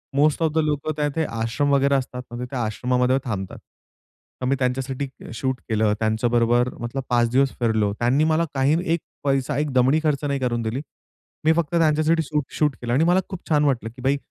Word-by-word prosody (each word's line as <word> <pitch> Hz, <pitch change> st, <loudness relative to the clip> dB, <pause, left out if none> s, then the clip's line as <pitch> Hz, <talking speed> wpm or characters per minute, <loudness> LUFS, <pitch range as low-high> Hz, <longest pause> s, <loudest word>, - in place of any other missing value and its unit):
Most 150 Hz, +3 st, +3 dB
of 160 Hz, -, +2 dB
the -, -, -2 dB
लोकं 150 Hz, 0 st, -1 dB
त्या 150 Hz, -1 st, +1 dB
तिथे 160 Hz, +3 st, -1 dB
आश्रम 115 Hz, +6 st, -1 dB
वगैरे 140 Hz, 0 st, +3 dB
असतात 125 Hz, -1 st, -2 dB
ना 120 Hz, -, -6 dB
तिथे 125 Hz, +2 st, -7 dB
आश्रमामध्ये 125 Hz, +3 st, +1 dB
थांबतात. 100 Hz, -6 st, -4 dB, 0.8 s
तर -, -, -1 dB
मी 135 Hz, +2 st, +2 dB
त्यांच्यासाठी 130 Hz, +1 st, -1 dB, 0.3 s
शूट 130 Hz, +2 st, -2 dB
केलं. 110 Hz, -1 st, +2 dB
त्यांच्याबरोबर 120 Hz, +2 st, +2 dB
मतलब 120 Hz, +3 st, -4 dB
5 120 Hz, -1 st, +3 dB
दिवस 135 Hz, +1 st, +3 dB
फिरलो. 110 Hz, -4 st, +1 dB
त्यांनी 125 Hz, +5 st, +2 dB
मला 160 Hz, +1 st, +2 dB
काही 135 Hz, +3 st, +2 dB, 0.2 s
एक 170 Hz, -, +1 dB, 0.2 s
पैसा, 135 Hz, 0 st, 0 dB
एक 150 Hz, 0 st, -1 dB
दमडी 130 Hz, +4 st, +4 dB
खर्च 150 Hz, -2 st, 0 dB
नाही 140 Hz, -1 st, -1 dB
करून 120 Hz, -2 st, -1 dB
दिली. 115 Hz, +4 st, -2 dB, 0.6 s
मी 160 Hz, -, +6 dB
फक्त 170 Hz, 0 st, -1 dB
त्यांच्यासाठी 160 Hz, 0 st, +3 dB
शूट, 150 Hz, 0 st, -1 dB
शूट 150 Hz, -4 st, +2 dB
केलं 120 Hz, -1 st, -2 dB
आणि 140 Hz, +6 st, +3 dB
मला 175 Hz, +2 st, +4 dB
खूप 185 Hz, -3 st, -8 dB
छान 150 Hz, -2 st, +3 dB
वाटलं, 125 Hz, -5 st, 0 dB
की 120 Hz, +3 st, -14 dB
भाई 135 Hz, +2 st, +2 dB
135 Hz, 195 wpm, -23 LUFS, 120-150 Hz, 0.8 s, मी